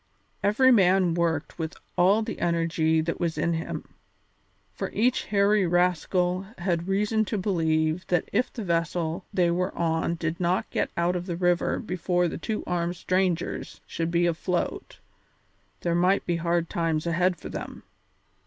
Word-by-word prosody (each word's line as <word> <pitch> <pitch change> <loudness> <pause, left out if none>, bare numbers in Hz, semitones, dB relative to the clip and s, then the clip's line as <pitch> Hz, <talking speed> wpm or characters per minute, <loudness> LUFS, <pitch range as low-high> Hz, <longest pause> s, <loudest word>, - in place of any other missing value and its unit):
Every 260 +6 +4
man 190 -5 +4
worked 165 -2 -1
with 160 0 -3 0.2
all 195 +5 +4
the - - -5
energy 165 -1 +1
that 165 +1 -3
was 170 -2 -1
in 170 - +1
him, 165 0 -4 0.9
for - - -4
each 240 +3 +2
hairy 200 -1 +3
rascal 180 +1 +1
had 175 -1 -1
reason 210 +3 +1
to 215 - -2
believe 160 -3 0
that 175 -2 +1
if 245 +5 +1
the 230 - -6
vessel 170 0 -1
they 175 -2 +2
were 180 +2 -1
on 165 0 0
did 165 +1 -3
not 180 +1 +1
get - - 0
out 170 +1 +1
of 180 +1 -4
the 170 -2 -3
river 175 -1 +1
before 180 -3 0
the - - -5
two 220 -2 -3
armed 175 0 -1
strangers 185 -1 -1
should 165 0 -3
be 170 0 +2
afloat 180 - -2 0.8
there 170 - 0
might 180 +3 +2
be 175 -1 0
hard 170 0 0
times 165 -2 -1
ahead 175 +1 +1
for - - -9
them. - - -7
175 Hz, 160 wpm, -26 LUFS, 170-185 Hz, 0.9 s, Every